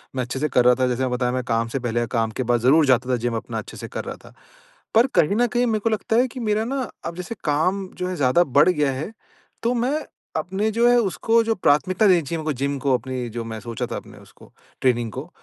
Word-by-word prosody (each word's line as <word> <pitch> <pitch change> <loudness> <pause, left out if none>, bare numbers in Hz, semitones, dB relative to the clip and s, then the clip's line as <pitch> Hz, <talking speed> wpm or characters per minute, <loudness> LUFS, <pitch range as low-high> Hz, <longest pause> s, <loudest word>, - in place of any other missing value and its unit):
मैं 130 - 0
अच्छे 125 +2 -4
से 150 - +1
कर 125 -1 +3
रहा 125 0 +6
था 130 0 +1
जैसे 125 0 -1
मैंने 130 -1 0
बताया 125 0 0
मैं 130 0 -2
काम 115 -1 0
से 125 +4 -3
पहले, 120 -1 -1
काम 115 -1 -1
के 130 - -3
बाद 120 0 +1
ज़रूर 145 +6 +5
जाता 130 -1 +2
था 125 - +3
जिम 120 0 -2
अपना 110 - -4
अच्छे - - -7
से - - -7
कर - - -5
रहा - - -5
था। - - -15 0.6
पर 230 +4 +6
कहीं 165 +6 +3
न 245 +1 +3
कहीं 245 +1 +1
मेरे 220 -2 +1
को 230 - 0
लगता 220 0 -1
है 250 +2 +4
कि 255 - -8
मेरा 215 -2 0
ना, 260 -2 -3 0.2
अब 170 - -4
जैसे 180 +6 -6
काम 180 +6 +1
जो 180 - -2
है 185 - -3
ज़्यादा 145 +3 +3
बढ़ 145 +2 +4
गया 150 -6 +1
है, 140 +9 -5 0.5
तो 235 +2 +2
मैं, 250 +5 0 0.4
अपने 190 +7 -1
जो 235 +2 +3
है 245 - +5
उसको 225 +2 +2
जो 225 0 0
प्राथमिकता 185 +5 +2
देनी 180 -3 +5
चाहिए 165 +3 -4
मेरे 155 - -6
को 155 - 0
जिम 140 +1 -1
को 135 0 +1
अपनी 125 -1 -5
जो 115 +1 -5
मैं 110 -1 -6
सोचा 115 -2 -4
था - - -2
अपने - - -11
उसको, - - -18 0.3
ट्रेनिंग 120 -3 +1
को, - - -7
150 Hz, 270 wpm, -22 LUFS, -, 0.6 s, रहा